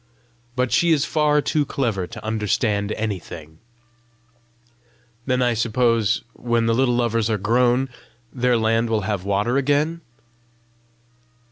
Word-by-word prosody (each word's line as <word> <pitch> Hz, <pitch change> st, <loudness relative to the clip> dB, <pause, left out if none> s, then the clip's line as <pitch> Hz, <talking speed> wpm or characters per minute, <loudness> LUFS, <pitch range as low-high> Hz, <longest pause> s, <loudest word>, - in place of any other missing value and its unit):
But 125 Hz, -1 st, 0 dB
she 170 Hz, -1 st, +3 dB
is 150 Hz, -3 st, +3 dB
far 150 Hz, -1 st, +2 dB
too 150 Hz, +1 st, 0 dB
clever 115 Hz, -10 st, -2 dB
to -, -, -10 dB
understand 105 Hz, -1 st, 0 dB
anything." 85 Hz, -7 st, -6 dB, 1.7 s
"Then 125 Hz, -1 st, +1 dB
I 120 Hz, -1 st, +2 dB
suppose, 115 Hz, -1 st, +1 dB
when 120 Hz, -1 st, 0 dB
the 115 Hz, -, +2 dB
little 125 Hz, 0 st, +2 dB
Lovers 115 Hz, -2 st, 0 dB
are 110 Hz, -, +1 dB
grown, 120 Hz, +5 st, +2 dB, 0.5 s
their 125 Hz, -1 st, +2 dB
land 115 Hz, +1 st, +1 dB
will 110 Hz, -1 st, +1 dB
have 100 Hz, -2 st, -3 dB
water 100 Hz, +6 st, 0 dB
again?" 145 Hz, +4 st, +1 dB
115 Hz, 125 wpm, -22 LUFS, 105-130 Hz, 1.7 s, she